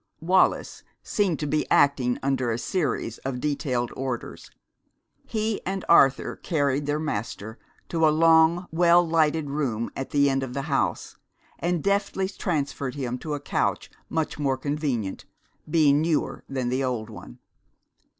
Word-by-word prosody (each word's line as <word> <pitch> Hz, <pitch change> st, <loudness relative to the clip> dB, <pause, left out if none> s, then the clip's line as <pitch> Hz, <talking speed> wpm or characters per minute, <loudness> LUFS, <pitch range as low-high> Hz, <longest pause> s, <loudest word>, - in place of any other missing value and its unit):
Wallis 185 Hz, +3 st, +2 dB, 0.2 s
seemed 195 Hz, -7 st, 0 dB
to -, -, -1 dB
be 150 Hz, +1 st, -1 dB
acting 130 Hz, -4 st, +3 dB
under 135 Hz, -3 st, 0 dB
a 115 Hz, -, 0 dB
series 135 Hz, -, -2 dB
of 130 Hz, -2 st, -4 dB
detailed 135 Hz, -4 st, -1 dB
orders. 130 Hz, -3 st, -5 dB, 0.8 s
He 220 Hz, -1 st, -2 dB
and 190 Hz, 0 st, -3 dB
Arthur 135 Hz, -5 st, +4 dB
carried 145 Hz, -3 st, 0 dB
their 145 Hz, +1 st, +1 dB
master 110 Hz, -6 st, -4 dB, 0.3 s
to 165 Hz, -2 st, +3 dB
a -, -, +5 dB
long, 165 Hz, +2 st, +4 dB
well 170 Hz, +1 st, +4 dB
lighted 160 Hz, -2 st, +1 dB
room 125 Hz, -6 st, -2 dB
at 135 Hz, -, -4 dB
the 140 Hz, -1 st, +3 dB
end 135 Hz, -1 st, +1 dB
of 130 Hz, -2 st, -5 dB
the 140 Hz, -, -2 dB
house, 140 Hz, -1 st, -1 dB, 0.4 s
and 175 Hz, -2 st, -1 dB
deftly 200 Hz, -1 st, 0 dB
transferred 145 Hz, -8 st, -3 dB
him 125 Hz, -3 st, -3 dB
to 150 Hz, +1 st, -3 dB
a -, -, -5 dB
couch -, -, -1 dB, 0.2 s
much 160 Hz, -1 st, -2 dB
more 135 Hz, -2 st, +1 dB
convenient, 135 Hz, -8 st, -3 dB, 0.4 s
being 150 Hz, -2 st, +4 dB
newer, 160 Hz, -1 st, -1 dB
than 130 Hz, -3 st, -2 dB
the 130 Hz, +2 st, 0 dB
old 120 Hz, -4 st, -3 dB
one. 85 Hz, -, -11 dB
145 Hz, 150 wpm, -25 LUFS, 130-160 Hz, 0.8 s, a